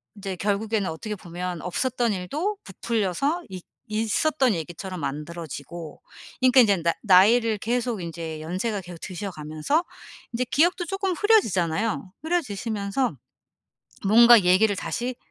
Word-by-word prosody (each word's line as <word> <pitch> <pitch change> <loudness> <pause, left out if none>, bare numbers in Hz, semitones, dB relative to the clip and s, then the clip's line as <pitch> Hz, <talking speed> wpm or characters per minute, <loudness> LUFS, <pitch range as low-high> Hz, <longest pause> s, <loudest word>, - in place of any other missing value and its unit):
인제 195 -2 -5
결국에는 205 0 0
어떻게 210 +6 -5
보면 175 -1 -6
없었던 240 +5 -1
일도 300 - -3
부풀려서 230 - -1
있 185 -2 -8 0.3
있었던 240 +4 +1
얘기처럼 175 +2 -6
만들어지고 155 +1 -6 0.4
그러니까 255 0 +6
인제 200 -4 +4
나 170 - +2
나이를 215 +3 +5
계속 240 -3 -1
인제 165 -2 -6
연세가 190 +5 -2
계속 175 -2 -10
드셔 195 +1 -5
가면서 155 - -1 0.5
인제 245 +2 0
기억도 345 +7 +2
쪼끔 390 +1 -1
흐려지잖아요. 210 - +1
흐려지시면서 225 - -1 0.9
뭔가 235 +1 +8
얘기를 195 +3 +4
다시 245 +5 -3
205 Hz, 325 characters per minute, -25 LUFS, 180-245 Hz, 0.9 s, 뭔가